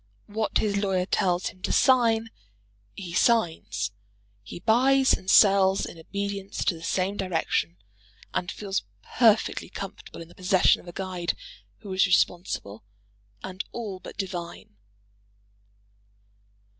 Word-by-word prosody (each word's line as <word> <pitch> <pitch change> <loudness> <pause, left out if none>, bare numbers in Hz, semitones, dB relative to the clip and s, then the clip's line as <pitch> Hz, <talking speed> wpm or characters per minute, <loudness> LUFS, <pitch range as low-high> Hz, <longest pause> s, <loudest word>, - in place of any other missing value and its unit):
What 215 +1 -1
his 205 -2 0
lawyer 190 -2 0
tells 180 -1 0
him 185 - -17
to - - -2
sign, 230 -4 +3 0.6
he 180 -4 -7
signs. 160 - +1 0.5
He 100 - -9
buys 260 +6 +4
and 190 - -3
sells 195 -2 +5
in 165 - -10
obedience 200 +3 -4
to - - +3
the 165 - -11
same 190 +4 -1
direction, 165 - -1 0.6
and 175 - -2
feels 195 -2 -3 0.2
perfectly 225 -3 +2
comfortable - - -8
in - - -15
the - - -17
possession 185 0 +3
of - - -19
a - - -7
guide 180 -2 -3 0.5
who 200 -2 -7
is 190 +1 +3
responsible 175 - 0 0.6
and 185 0 -5
all 210 -6 -5
but - - -11
divine. 175 - -6
190 Hz, 130 wpm, -26 LUFS, 175-205 Hz, 0.6 s, sells